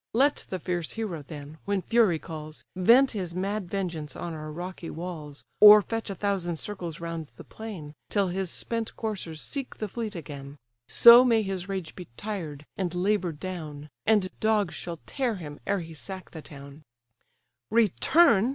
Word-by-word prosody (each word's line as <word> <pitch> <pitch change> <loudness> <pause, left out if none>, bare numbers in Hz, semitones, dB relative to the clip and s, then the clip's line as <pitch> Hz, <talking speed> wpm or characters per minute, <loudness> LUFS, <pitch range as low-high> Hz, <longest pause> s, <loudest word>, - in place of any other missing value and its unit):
Let 275 +5 +2
the 185 - -2
fierce 175 -2 -3
hero, 210 -8 -3
then, 145 +1 -10
when 200 -2 0
fury 220 -5 +3
calls, 155 -1 -8
Vent 235 +9 +6
his 180 -6 -4
mad 195 0 -2
vengeance 170 -7 -3
on 170 - -5
our 155 -1 -6
rocky 175 +1 -6
walls, 155 -4 -7
Or 210 0 +10
fetch 225 0 -3
a 195 - -3
thousand 185 -4 -1
circles 175 -4 -5
round 165 -2 -5
the - - -11
plain, 190 -10 -8 0.2
Till 200 -2 +1
his 190 0 -2
spent 230 +5 -2
coursers 190 -8 -4
seek 275 -3 -5
the 215 - -3
fleet 215 0 -5
again: 145 -3 -8 0.3
So 235 - +9
may 230 -3 +3
his 190 -1 -4
rage 190 -5 -4
be 180 -3 -9
tired, 165 -9 -5
and 180 -3 -2
labour'd 180 -4 0
down! 155 -5 -6 0.2
And 210 -4 +4
dogs 215 -5 +2
shall 170 -1 -6
tear 255 -5 -1
him 150 -5 -8
ere 200 -2 +1
he 165 -1 -9
sack 185 +4 -7
the 160 - -8
town." 140 0 -12 0.9
"Return! 230 - +4
185 Hz, 170 wpm, -27 LUFS, 160-210 Hz, 0.9 s, Or